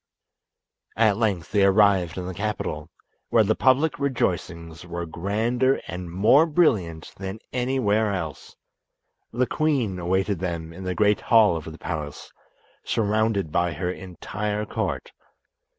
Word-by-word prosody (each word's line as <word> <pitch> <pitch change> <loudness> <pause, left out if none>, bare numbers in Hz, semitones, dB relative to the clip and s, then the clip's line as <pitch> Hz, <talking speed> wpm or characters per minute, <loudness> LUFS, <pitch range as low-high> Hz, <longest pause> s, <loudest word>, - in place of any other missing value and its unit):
At 110 -3 +4
length 100 -7 -1
they 100 -2 +3
arrived 95 -3 +4
in 90 - -4
the 95 - -5
capital, 85 -6 -3 0.4
where 115 - +5
the 110 +1 +2
public 140 +6 +2
rejoicings 90 - -2
were 85 0 -5
grander 110 +10 0
and 90 0 -6
more 110 - +5
brilliant 105 - +1
than 95 +1 -5 0.2
anywhere 120 -4 +1
else. 80 -7 -5 0.8
The 125 +2 +1
queen 130 -12 0
awaited 95 +2 0
them 85 -3 -4
in 95 +2 -9
the 90 0 -2
great 105 +2 +3
hall 110 -6 +5
of 80 0 -6
the 80 - -11
palace, 75 -5 -6 0.5
surrounded 110 -5 0
by 85 +1 +1
her 90 +4 -2
entire 105 +3 -4
court. - - -3
100 Hz, 135 wpm, -24 LUFS, 85-110 Hz, 0.8 s, where